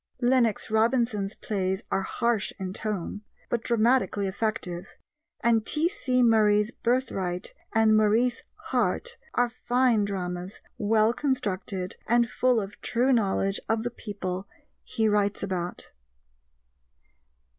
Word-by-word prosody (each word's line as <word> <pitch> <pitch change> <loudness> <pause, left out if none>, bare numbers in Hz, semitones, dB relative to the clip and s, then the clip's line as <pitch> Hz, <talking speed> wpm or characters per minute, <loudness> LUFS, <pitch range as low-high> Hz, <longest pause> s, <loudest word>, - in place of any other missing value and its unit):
Lennox 240 -4 +2
Robinson's 220 -3 +1
plays 190 0 -2
are 195 - +1
harsh 230 +2 0
in 190 -1 -4
tone, 205 -2 -3 0.3
but 235 -1 0
dramatically 235 -3 +2
effective, 190 -3 -3 0.5
and 230 -2 +3
T.C. 300 - +1
Murray's 210 -2 +4
Birthright 195 -8 -2 0.2
and 220 -1 +5
Maurice 220 +3 +3 0.3
Harte 485 0 0 0.2
are 245 - +3
fine 245 -2 +2
dramas, 180 -1 -4 0.2
well 215 +1 +3
constructed 200 -9 -2
and 235 +1 +4
full 250 +1 +2
of 200 -1 -7
true 250 +3 +2
knowledge 195 -3 +1
of 225 0 +1
the 240 - -2
people 195 -4 -5 0.4
he 220 -1 0
writes 205 -1 +1
about. 180 -2 -4
215 Hz, 115 wpm, -27 LUFS, 195-240 Hz, 0.5 s, and